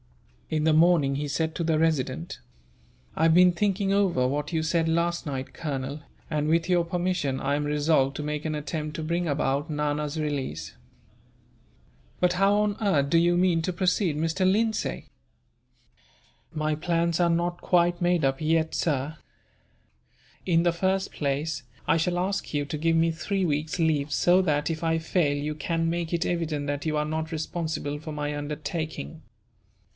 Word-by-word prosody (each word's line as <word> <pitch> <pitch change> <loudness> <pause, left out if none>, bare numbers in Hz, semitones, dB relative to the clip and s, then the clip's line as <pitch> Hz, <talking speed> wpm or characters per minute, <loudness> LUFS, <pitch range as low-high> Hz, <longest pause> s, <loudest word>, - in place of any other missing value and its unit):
In 155 -1 0
the 160 - +4
morning 155 -4 +4
he 145 +1 -2
said 160 +3 -1
to 170 - -2
the 160 -1 +1
Resident: 135 - -1 0.8
"I - - 0
have 165 0 +5
been 180 0 +6
thinking 195 +1 0
over 180 -11 +2
what 145 +3 -2
you 160 -2 0
said 165 0 +1
last 170 +1 0
night, 135 -3 -5
Colonel, 140 -1 -4 0.3
and 150 -1 -1
with 165 +1 +2
your 175 -2 +3
permission 175 -5 -1
I 140 +1 0
am 145 - -1
resolved 145 -2 +2
to 150 - -4
make 150 0 -3
an 155 -1 -2
attempt 150 0 -4
to 160 - -4
bring 170 +2 -1
about 140 +1 0
Nana's 150 0 -2
release." 130 - -3 1.4
"But 180 -1 +3
how 195 +3 +3
on 210 0 0
earth 145 -10 +2
do 165 - +5
you 175 +1 +3
mean 175 -2 +3
to 185 - -1
proceed, 180 -3 +1
Mr. 165 +4 +1
Lindsay?" 220 +2 0 1.5
"My 155 -1 -1
plans 170 +1 0
are 170 - +3
not 175 +1 0
quite 175 0 +2
made 175 -4 +2
up 135 +1 0
yet, 160 +1 +1
sir. 150 -1 -1 1.3
In 170 -2 +3
the 175 -1 +2
first 190 +2 0
place, 145 +1 -2 0.2
I - - +4
shall 175 +2 0
ask 190 -1 -2
you 145 0 0
to 150 +2 -4
give 165 +2 +1
me 165 0 +3
three 190 +4 -1
weeks' 155 +2 -1
leave 150 -3 +1
so 180 +5 +4
that, 150 -4 0
if 165 0 -3
I 165 0 +2
fail, 160 -3 0
you 150 +1 -2
can 165 +1 -1
make 170 -1 -2
it 170 -1 0
evident 160 -4 -1
that 145 +1 -3
you 155 -1 0
are 150 - 0
not 160 +1 -3
responsible 160 -2 -3
for 155 +1 -7
my 150 0 -3
undertaking. 150 - -5
160 Hz, 175 wpm, -26 LUFS, 150-175 Hz, 1.5 s, been